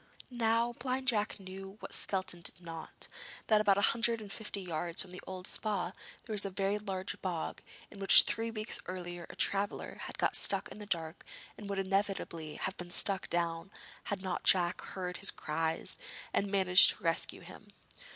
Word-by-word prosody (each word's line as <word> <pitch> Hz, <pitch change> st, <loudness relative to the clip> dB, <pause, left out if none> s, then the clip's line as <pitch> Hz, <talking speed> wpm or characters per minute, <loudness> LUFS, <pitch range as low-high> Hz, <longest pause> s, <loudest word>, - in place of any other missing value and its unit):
Now 235 Hz, 0 st, +2 dB
Blind 260 Hz, 0 st, -2 dB
Jack 210 Hz, -3 st, +2 dB
knew 195 Hz, +1 st, -8 dB
what -, -, -7 dB
Skelton 185 Hz, -3 st, 0 dB
did 170 Hz, -, -3 dB
not, 165 Hz, -2 st, -7 dB, 0.4 s
that 215 Hz, -1 st, +5 dB
about 200 Hz, -2 st, +4 dB
a -, -, +3 dB
hundred 230 Hz, 0 st, +3 dB
and 205 Hz, -2 st, -8 dB
fifty 210 Hz, -2 st, -4 dB
yards 170 Hz, -2 st, 0 dB
from 185 Hz, -, -13 dB
the 180 Hz, -, -8 dB
old 185 Hz, -1 st, -6 dB
Spa 200 Hz, -4 st, -1 dB, 0.3 s
there 220 Hz, -, -4 dB
was 205 Hz, -, +4 dB
a 200 Hz, -, -1 dB
very 195 Hz, +2 st, 0 dB
large 190 Hz, -2 st, -4 dB
bog, 175 Hz, -4 st, -3 dB, 0.3 s
in -, -, -11 dB
which 195 Hz, -, +9 dB
three 225 Hz, 0 st, -1 dB
weeks 215 Hz, 0 st, -2 dB
earlier 175 Hz, -1 st, -5 dB
a -, -, -9 dB
traveller 200 Hz, +1 st, -1 dB
had -, -, -8 dB
got -, -, +2 dB
stuck 195 Hz, -1 st, +2 dB
in -, -, -10 dB
the 210 Hz, -, -8 dB
dark, 165 Hz, -3 st, -3 dB, 0.3 s
and 205 Hz, -1 st, -8 dB
would 200 Hz, -, -2 dB
inevitably 195 Hz, -5 st, -1 dB
have 190 Hz, -, -3 dB
been 175 Hz, -1 st, -7 dB
sucked 190 Hz, +2 st, +2 dB
down 170 Hz, +1 st, -1 dB, 0.4 s
had 200 Hz, -2 st, -3 dB
not 185 Hz, -, -2 dB
Jack 175 Hz, -2 st, +3 dB
heard 180 Hz, -2 st, -4 dB
his 195 Hz, -, 0 dB
cries 160 Hz, +1 st, -2 dB, 0.3 s
and 200 Hz, -, +1 dB
managed 190 Hz, -2 st, +7 dB
to -, -, -19 dB
rescue 165 Hz, -1 st, 0 dB
him. -, -, -12 dB
195 Hz, 185 wpm, -33 LUFS, 175-210 Hz, 0.4 s, which